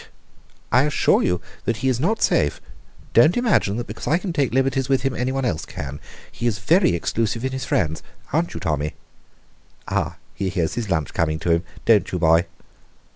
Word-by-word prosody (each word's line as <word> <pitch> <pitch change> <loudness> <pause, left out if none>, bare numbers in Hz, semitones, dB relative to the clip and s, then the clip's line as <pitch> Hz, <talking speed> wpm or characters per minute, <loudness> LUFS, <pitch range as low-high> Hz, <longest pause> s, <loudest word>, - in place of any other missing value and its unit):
"I 125 +4 +5
assure 150 - +3
you 90 0 0 0.2
that 115 - 0
he - - +3
is 125 -2 +1
not 210 - +1
safe. 75 - +2 0.5
Don't 155 - +5
imagine 205 - +2
that 120 - -3
because - - -8
I 160 - +3
can 185 -1 -4
take 140 -7 +1
liberties 135 +1 +1
with 135 -2 +2
him 135 -1 0
anyone 130 +1 -1
else 80 -10 -1
can. 70 +1 -7 0.3
He 120 - -3
is 110 -4 0
very 160 - +3
exclusive 115 +6 -1
in 130 - -1
his 130 0 -4
friends 80 -3 0 0.3
aren't 165 +3 0
you, - - -3
Tommy? 75 -1 -2 0.9
Ah, 85 +3 -1 0.2
he 95 +2 -2
hears 85 -4 -1
his 115 -4 -3
lunch 80 -6 -1
coming 80 -1 0
to 85 - +1
him! 85 +1 +2 0.2
Don't 110 -3 +4
you, 90 - -1
boy?" 85 0 +4
115 Hz, 190 wpm, -22 LUFS, 85-135 Hz, 0.9 s, I